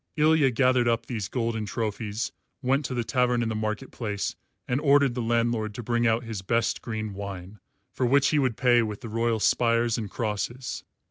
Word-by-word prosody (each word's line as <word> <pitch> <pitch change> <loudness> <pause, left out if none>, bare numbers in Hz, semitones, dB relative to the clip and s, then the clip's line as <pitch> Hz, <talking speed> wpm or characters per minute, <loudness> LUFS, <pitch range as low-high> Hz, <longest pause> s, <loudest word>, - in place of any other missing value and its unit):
Ilya 155 -2 +4
gathered 125 0 +3
up 115 -1 +1
these 110 -6 -3
golden 115 -3 -2
trophies, 110 +1 -3 0.3
went 135 +3 +1
to 130 - -3
the 120 - 0
tavern 125 0 +1
in 115 - -1
the 110 - -2
market 110 +4 -3
place 105 -4 -3 0.3
and 125 +3 0
ordered 140 -3 +4
the 125 - -3
landlord 115 -2 0
to 120 - -5
bring 120 +2 +1
out 115 +2 +2
his 110 -4 -5
best 115 +5 0
green 110 -2 -4
wine, 100 0 -7 0.3
for 125 - 0
which 135 +2 +4
he 150 - +2
would 130 -5 0
pay 120 -2 +4
with 105 -1 -4
the 115 - -7
royal 115 0 0
spires 115 +1 +2
and 105 -3 -5
crosses. 120 +4 -3
115 Hz, 195 wpm, -26 LUFS, 110-125 Hz, 0.3 s, Ilya